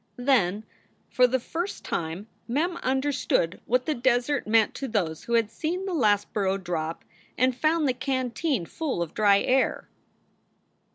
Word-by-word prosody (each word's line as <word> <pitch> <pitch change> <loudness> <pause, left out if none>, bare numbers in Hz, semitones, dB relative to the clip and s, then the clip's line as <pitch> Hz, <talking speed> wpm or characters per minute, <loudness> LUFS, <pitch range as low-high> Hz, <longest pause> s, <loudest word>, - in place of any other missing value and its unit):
Then 220 -6 +2 0.5
for 250 -1 +5
the 260 +1 0
first 340 +10 -5
time 165 +4 -3 0.2
Mem 325 +8 0
understood 265 - 0
what 250 +1 +1
the 310 - 0
desert 255 +1 +1
meant 220 0 +3
to 270 - -5
those 175 -9 -2
who 235 - -3
had 230 -2 +2
seen 360 +4 -3
the 380 - -3
last 205 -9 +2
burro 195 -2 +1
drop 170 -3 -4 0.3
and 255 0 +2
found 310 +3 +2
the 255 - +2
canteen 260 - -1
full 275 - -2
of 165 - -9
dry 200 -2 +4
air. 260 +1 +1
245 Hz, 155 wpm, -26 LUFS, 200-280 Hz, 0.5 s, for